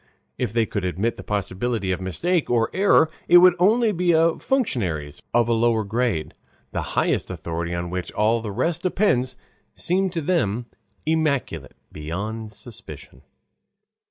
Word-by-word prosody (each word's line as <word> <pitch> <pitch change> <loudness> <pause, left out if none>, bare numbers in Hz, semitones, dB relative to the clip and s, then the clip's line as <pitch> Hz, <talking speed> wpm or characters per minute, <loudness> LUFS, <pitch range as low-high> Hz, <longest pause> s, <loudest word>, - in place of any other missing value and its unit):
If 125 -5 -1
they 115 0 +2
could 100 -2 -4
admit 95 +6 -1
the - - -8
possibility 105 +1 -2
of 90 0 -2
mistake 165 - -1
or 115 -2 +2
error, 190 -4 +4 0.2
it 175 - +8
would 180 0 +8
only 220 +5 +4
be 180 -2 +1
in 165 0 +3
functionaries 90 - -1
of 120 -1 +3
a 120 - +2
lower 115 -1 +2
grade; 110 -7 -1 0.4
the - - -2 0.2
highest - - +1
authority 85 +1 -4
on 85 0 -4
which 90 -1 -4
all 110 +2 +2
the 110 -2 -5
rest 165 - -1
depends 130 -10 +1 0.4
seems 185 +2 0
to 165 - -1
them 125 - 0 0.4
immaculate 140 - -1
beyond 105 +8 -5
suspicion. 110 +1 -11
115 Hz, 150 wpm, -23 LUFS, -, 0.4 s, it